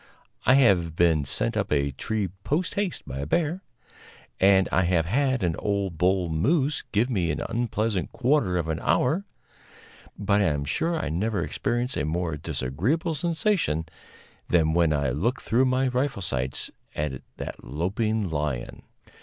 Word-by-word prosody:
I 130 - +7
have 90 - +4
been 80 -4 +3
sent 115 - 0
up 105 -2 -1
a 70 -1 +2
tree 100 +8 -2
post 180 +5 0
haste 200 -3 -2
by 65 - -5
a 70 - -3
bear, 170 - 0 0.8
and 95 0 +5
I - - +3
have 85 -2 +2
had 130 +3 +1
an 85 -2 +1
old 100 -5 -2
bull 90 0 +2
moose 140 - +1
give 110 +4 +2
me 95 -10 0
an - - -2
unpleasant 110 -4 -1
quarter 125 -8 +1
of 85 -2 -1
an 80 0 -2
hour, 140 - +1 0.9
but 100 0 +2
I - - +3
am 75 -4 0
sure 165 - 0
I - - -2
never 100 +7 -1
experienced 120 +3 -2
a - - 0
more 80 +1 -1
disagreeable 95 - -1
sensation 160 - 0 0.6
than 80 -2 +3
when 85 -2 +3
I 70 -4 +1
looked 110 - -1
through 125 +4 +3
my 130 +1 +2
rifle 125 -5 -1
sights 65 -5 -2 0.2
at 75 -4 -3 0.2
that - - -7
loping 100 - -1
lion. 75 -6 -3
95 Hz, 160 wpm, -26 LUFS, 80-130 Hz, 0.9 s, I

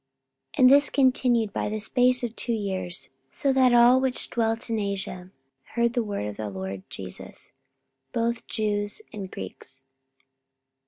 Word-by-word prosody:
44:019:010 - - -9
And 255 - +9
this 285 +1 +6
continued 250 -5 +2
by - - -1
the 215 +1 -2
space 250 +3 +2
of 235 -1 -3
two 235 - -1
years; 190 -4 -3 0.2
so 275 -1 0
that 260 -1 +5
all 240 +2 +7
they 265 0 +2
which 250 - -6
dwelt 225 0 0
in 225 -2 -1
Asia 195 -3 -4 0.5
heard 235 0 +2
the 240 - +1
word 205 - -3
of 105 -1 -5
the 110 -1 -4
Lord 95 0 -5
Jesus, 95 -2 -10 0.6
both 235 - -1
Jews 205 - -2
and 200 -3 -6
Greeks. 135 - -7
225 Hz, 160 wpm, -26 LUFS, 190-245 Hz, 0.6 s, And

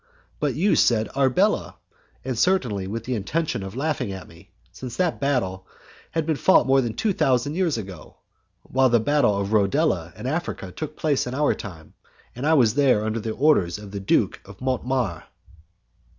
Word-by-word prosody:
But 145 -5 -1
you 195 +7 +2
said 110 -2 +3
Arbela, 130 -2 +1 0.5
and 130 -1 -2
certainly 115 - +1
with 110 +3 -4
the 125 - -3
intention 125 +5 -2
of 95 +2 -7
laughing 135 -5 -2
at 95 -1 -8
me, 85 +4 -17 0.2
since 125 -2 -8
that 180 -3 0
battle 95 -10 -1 0.4
has 165 - -1
been 155 -1 -1
fought 190 - +4
more 135 0 +4
than 115 -3 -3
two 215 -3 0
thousand 135 -1 +1
years 170 -6 0
ago, 95 -7 -9 0.5
while 130 0 +2
the 120 -1 +4
battle 110 -4 +2
of 100 +2 -2
Rodela 95 -4 +1
in - - -8
Africa 140 - -3
took 155 - -7
place 145 -5 0
in 125 - -4
our 150 +1 +2
time, 85 -7 -10 0.4
and 130 +5 -3
I 160 - +5
was 120 -7 +4
there 130 -6 +3
under 110 +1 -1
the 110 - -4
orders 125 - +2
of 105 -1 -10
the 100 - -4
Duke 95 - +1
de 100 - -12
Mortemar." 125 - -1
125 Hz, 180 wpm, -24 LUFS, 100-145 Hz, 0.5 s, I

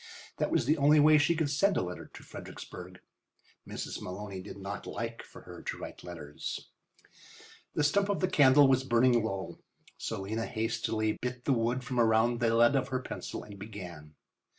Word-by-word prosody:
That - - 0
was - - +2
the 155 +1 +2
only 150 +2 +6
way 150 +1 +7
she 160 +3 +3
could 155 -3 0
send 195 +7 +3
a - - +1
letter 90 0 -6
to - - -12
Fredericksburg. 90 0 -9 0.7
Mrs. - - -5
Maloney 95 +1 -6
did 100 - -9
not 100 +1 -6
like 115 +2 -4
for - - -13
her - - -11
to - - -4
write - - -8
letters. 80 -4 -7 1.0
The 150 - +2
stump 200 +7 +2
of 200 - +1
the 185 - +2
candle 145 -5 +6
was 130 -1 +3
burning 120 -2 +4
low, 95 -5 -4 0.4
so 110 -3 -3
Lena 110 +4 -3
hastily 110 -1 -1
bit 125 0 -4
the 140 - +3
wood 120 +2 0
from 125 -1 -2
around 115 +1 +3
the 115 -2 +2
lead 120 +4 +5
of 130 -1 +1
her 130 -1 -1
pencil - - -6
and 100 -1 -11
began. 90 -8 -9
115 Hz, 185 wpm, -31 LUFS, 100-135 Hz, 1.0 s, way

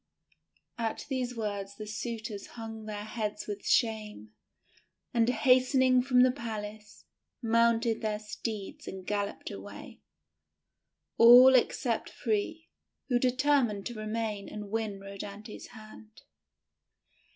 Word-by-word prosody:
At 225 -1 -2
these 250 -3 -2
words 200 -2 -4
the 215 - -7
suitors 220 -1 -5
hung 225 -1 -7
their 210 -1 -5
heads 215 -1 -4
with 205 -1 -6
shame, 215 - 0 0.8
and, 230 0 +3
hastening 255 +1 +4
from 250 -1 +4
the 255 - +5
palace, 215 -4 -7 0.3
mounted 230 0 +2
their 215 -1 -1
steeds 210 -1 -6
and 190 -1 -7
galloped 205 0 -3
away 100 +1 -10 0.6
— 75 0 -57
all 245 +3 +10
except 240 -2 +1
three, 235 +9 -2 0.4
who 245 -1 +3
determined 255 -5 +2
to 240 - -4
remain 215 -2 -3
and 210 -1 -7
win 220 -3 -2
Rhodanthe's 200 +2 -8
hand. 215 -1 -14
220 Hz, 115 wpm, -30 LUFS, 210-240 Hz, 0.8 s, all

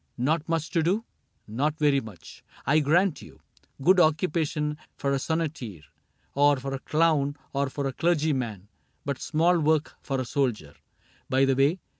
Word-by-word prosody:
— - - -45
Not 165 0 -1
much 165 -1 -1
to 170 - +2
do? 195 +8 0 0.4
Not 145 +8 -1
very 145 -3 +3
much, 105 -7 -12 0.2
I 150 +3 +4
grant 165 +4 +2
you: - - -14 0.4
Good 185 +4 +5
occupation 155 -2 +1 0.2
for 140 0 0
a 135 - +1
sonneteer. 140 - -3 0.5
Or 145 0 +4
for 135 +1 -5
a 135 - -3
clown, 150 -2 +1 0.2
or 140 0 0
for 140 +1 -4
a 135 - -2
clergyman. 135 - 0 0.4
But 140 -2 -3
small 170 +3 +2
work 155 0 +1
for 135 -2 -2
a 130 - -2
soldier. 115 - -1 0.6
By 135 +1 +3
the 135 -1 +2
way. 140 +6 +3
145 Hz, 165 wpm, -26 LUFS, 135-160 Hz, 0.6 s, Good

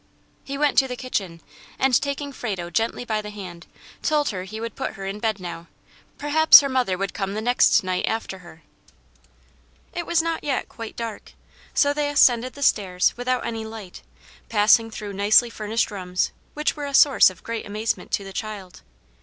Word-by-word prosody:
He 275 0 -5
went 295 0 +3
to 265 - +1
the 250 - -5
kitchen, 195 -10 -4 0.4
and, 265 -2 +3
taking 280 0 -4
Frado 190 -9 -5
gently 225 +3 -1
by 215 -2 -1
the 210 - -8
hand, 185 -4 -9 0.3
told 300 -2 +1
her 185 -3 -5
he 215 +3 -7
would 230 -1 -6
put - - -4
her 195 -2 -8
in 195 +2 -5
bed 220 -2 -1
now; 170 -2 -7 0.5
perhaps 310 +2 +7
her 280 - -2
mother 250 -8 0
would 195 +1 -3
come 195 -1 -3
the - - -2
next 230 -2 +3
night 185 -1 -1
after 220 -4 -3
her. 165 -3 -15 1.3
It 345 -1 -4
was 340 -1 +2
not 330 0 -1
yet 275 -3 -1
quite 230 -2 -9
dark, 230 -2 -7 0.4
so 285 0 +3
they 295 0 -1
ascended 255 -3 +3
the 285 - -6
stairs 185 -7 +2
without 250 +1 -1
any 225 -1 -4
light, 220 -4 -9 0.5
passing 225 +1 +4
through 210 -2 -7
nicely 210 +4 +4
furnished 220 +1 -1
rooms, 185 -2 -2 0.2
which 300 0 0
were 290 -2 -5
a 280 - -2
source 280 -7 +6
of 185 - -15
great 230 -2 -5
amazement 215 +2 -3
to 200 - 0
the 195 0 -9
child. 195 -5 -7
220 Hz, 185 wpm, -23 LUFS, 195-265 Hz, 1.3 s, perhaps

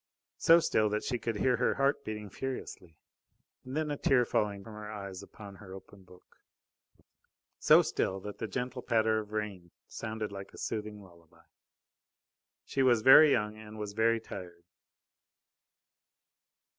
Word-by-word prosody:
So 165 +1 +6
still 110 -9 +1
that 105 +1 -2
she 125 -3 -2
could 115 0 -3
hear 125 +3 +2
her 125 - +1
heart 140 +1 +1
beating 105 -2 -6
furiously, 125 -11 -7 0.7
and 130 +3 -6
then 155 -1 -1
a 145 - -2
tear 125 -3 +3
falling 100 -3 -1
from 110 - -11
her 105 0 -8
eyes 100 -3 -7
upon 100 -2 -12
her 95 -2 -11
open 95 +1 -14
book. 90 -1 -20 1.2
So - - +6
still 95 - -1
that 105 +1 -8
the 110 - -3
gentle 125 +2 -4
patter 110 -2 +1
of 105 - -7
the 110 - -8
rain 100 -5 -4 0.2
sounded 110 -2 -5
like 100 -1 -9
a - - -13
soothing 105 -2 -5
lullaby. 85 -3 -20 1.2
She 135 - -1
was 120 -4 +3
very 140 +4 +9
young, 105 -2 0
and 110 0 -11
was 105 -1 -5
very 115 +1 +2
tired. 90 -5 -10
105 Hz, 155 wpm, -31 LUFS, 100-120 Hz, 1.2 s, very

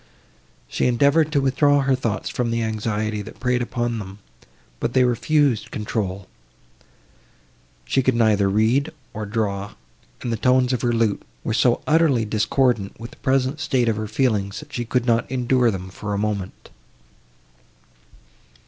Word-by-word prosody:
She - - 0
endeavoured 140 +6 +3
to 145 - +2
withdraw 140 +2 +3
her 135 0 +2
thoughts 115 -5 -2
from 125 -1 -2
the 115 0 -1
anxiety, 110 -1 -2
that 105 - -11
preyed 125 -1 +1
upon 120 -1 -2
them, 95 -1 -8 0.6
but 120 - -2
they 130 - +4
refused 125 0 +1
control; 100 -3 -3 1.6
she 95 - +1
could 130 -1 +1
neither 105 -4 +3
read, 115 +9 +2 0.2
nor 110 -1 -5
draw, 100 -2 -2 0.5
and 120 -2 -2
the - - -1
tones 125 +2 +3
of 125 - -1
her 120 - +1
lute 115 -3 +1 0.2
were - - -1
so 120 +1 +2
utterly 150 -7 +3
discordant 110 0 0
with 115 +1 -8
the - - -16
present 135 +2 0
state 130 -6 +1
of 110 -2 +1
her 110 0 -3
feelings, 105 -4 0
that 150 0 -15
she 120 - -3
could 125 +1 0
not 115 -1 +1
endure 125 -1 +2
them 95 -3 -5
for 105 +1 -4
a - - -1
moment. 100 -2 -4
115 Hz, 155 wpm, -22 LUFS, 105-130 Hz, 1.6 s, they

